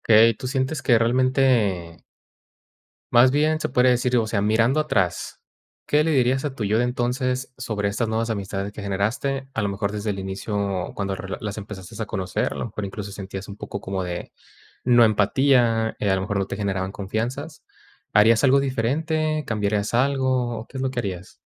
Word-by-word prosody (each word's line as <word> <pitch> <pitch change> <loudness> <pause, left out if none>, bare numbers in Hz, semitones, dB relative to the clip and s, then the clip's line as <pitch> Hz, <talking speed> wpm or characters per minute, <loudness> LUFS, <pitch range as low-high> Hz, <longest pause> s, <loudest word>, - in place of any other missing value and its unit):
Okey, 115 0 +6
tú 130 - -7
sientes 135 +3 -1
que 120 -3 +4
realmente 115 - +1 1.1
más 120 +2 +7
bien, 155 +3 +2
se - - -1
podría 125 0 +4
decir, 125 0 +1
o 115 -2 +2
sea, 110 -2 0
mirando 115 +7 +3
atrás, 95 - -1 0.5
¿qué 150 +1 +3
le 160 - 0
dirías 130 0 +2
a 140 - -2
tu 115 - -3
yo 105 +2 +2
de 120 - +2
entonces 125 +1 -1
sobre 110 -5 -2
estas 110 +3 -1
nuevas 115 +1 -1
amistades 100 -1 -3
que 105 - -8
generaste? 120 +8 -1
A 115 - -1
lo 100 - 0
mejor 100 +1 -2
desde 105 0 -2
el 100 - -3
inicio 95 -1 -3
cuando 100 -1 -2
re 95 0 -5
las 105 -1 -4
empezaste 105 +1 -8
a 110 - -4
conocer, 95 -2 -2
a - - -6
lo - - -3
mejor 105 -2 -5
incluso 100 0 -6
sentías 95 -1 -7
un 100 - -8
poco 100 - -6
como 95 0 -3
de, 90 -1 -5 0.5
no 120 -1 +6
empatía, 115 +1 +3
eh, 100 - +1
a - - +4
lo 95 - -2
mejor 100 0 -2
no 95 - 0
te - - -5
generaban 95 -2 -2
confianzas, 120 +11 -4 0.5
¿harías 110 +3 +5
algo 135 +1 +6
diferente? 155 +5 0
¿Cambiarías 105 0 -1
algo? 130 -2 +1
¿O 110 - -8
qué 135 - -8
es 130 - -2
lo 130 - 0
que 130 - -6
harías? 95 -4 -6
115 Hz, 195 wpm, -23 LUFS, 100-130 Hz, 1.1 s, más